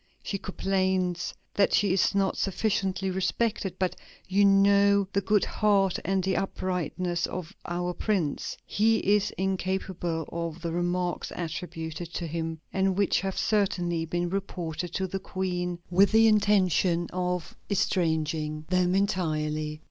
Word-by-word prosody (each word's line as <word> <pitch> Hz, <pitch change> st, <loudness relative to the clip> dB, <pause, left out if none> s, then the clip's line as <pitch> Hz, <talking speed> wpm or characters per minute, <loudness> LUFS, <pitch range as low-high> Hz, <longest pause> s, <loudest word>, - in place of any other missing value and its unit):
She 200 Hz, -, -3 dB
complains 185 Hz, -2 st, 0 dB, 0.2 s
that 200 Hz, -, +3 dB
she 200 Hz, -3 st, +3 dB
is 195 Hz, -, +2 dB
not 195 Hz, -1 st, +2 dB
sufficiently 195 Hz, -1 st, 0 dB
respected. 195 Hz, 0 st, -1 dB
But 185 Hz, -2 st, 0 dB, 0.3 s
you 195 Hz, +2 st, +3 dB
know 200 Hz, 0 st, +5 dB
the 200 Hz, -, +2 dB
good 205 Hz, +1 st, +2 dB
heart 200 Hz, -3 st, +2 dB
and 190 Hz, +1 st, 0 dB
the 190 Hz, 0 st, +1 dB
uprightness 180 Hz, -2 st, -2 dB
of 180 Hz, -3 st, -6 dB
our 175 Hz, +1 st, -2 dB
Prince; 180 Hz, -8 st, -1 dB
he 225 Hz, +2 st, +2 dB
is 205 Hz, -1 st, +2 dB
incapable 185 Hz, -3 st, -2 dB
of 170 Hz, -1 st, -4 dB
the 170 Hz, -, -2 dB
remarks 175 Hz, +1 st, -1 dB
attributed 165 Hz, -1 st, -5 dB
to 175 Hz, -, -2 dB
him, 165 Hz, 0 st, -3 dB
and 190 Hz, -1 st, +1 dB
which 200 Hz, -1 st, +2 dB
have 195 Hz, -1 st, -3 dB
certainly 180 Hz, -5 st, +1 dB
been 175 Hz, +1 st, -2 dB
reported 175 Hz, -3 st, -3 dB
to 190 Hz, -, 0 dB
the 195 Hz, +1 st, -3 dB
Queen 180 Hz, -2 st, -3 dB
with 195 Hz, +3 st, +5 dB
the 225 Hz, 0 st, +6 dB
intention 190 Hz, -5 st, +3 dB
of 180 Hz, -1 st, -2 dB
estranging 160 Hz, -5 st, 0 dB
them 180 Hz, 0 st, +2 dB
entirely." 155 Hz, -6 st, -1 dB
185 Hz, 135 wpm, -27 LUFS, 170-195 Hz, 0.3 s, the